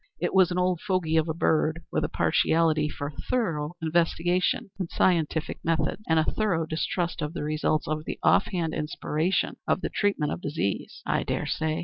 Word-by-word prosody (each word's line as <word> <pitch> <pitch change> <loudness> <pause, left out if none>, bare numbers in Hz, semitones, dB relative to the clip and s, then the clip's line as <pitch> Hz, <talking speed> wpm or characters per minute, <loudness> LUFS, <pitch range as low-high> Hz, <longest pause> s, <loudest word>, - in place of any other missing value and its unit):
It 175 - -1
was 190 -2 +5
an 180 - -2
old 180 -1 +1
fogy 185 -5 0
of 160 0 +2
a - - 0
bird, 160 0 +1
with - - 0
a - - -1
partiality 160 -2 +2
for 145 -1 -5
thorough 165 - -2
investigation 175 +3 +1
and 180 -3 -2
scientific 160 -3 +1
methods, 160 +3 0
and 160 - +4
a 160 - +4
thorough 175 -3 0
distrust 170 +2 -2
of 150 +1 -3
the 175 - -4
results 155 0 0
of 155 0 -2 0.2
off - - +5
hand 165 -3 -2
inspiration 155 +3 -1
in - - +4
the - - -3
treatment 200 -8 0
of - - -4
disease." 140 - -3
"I - - +1
dare - - -2
say. 160 0 -1
160 Hz, 180 wpm, -27 LUFS, 155-180 Hz, 0.2 s, was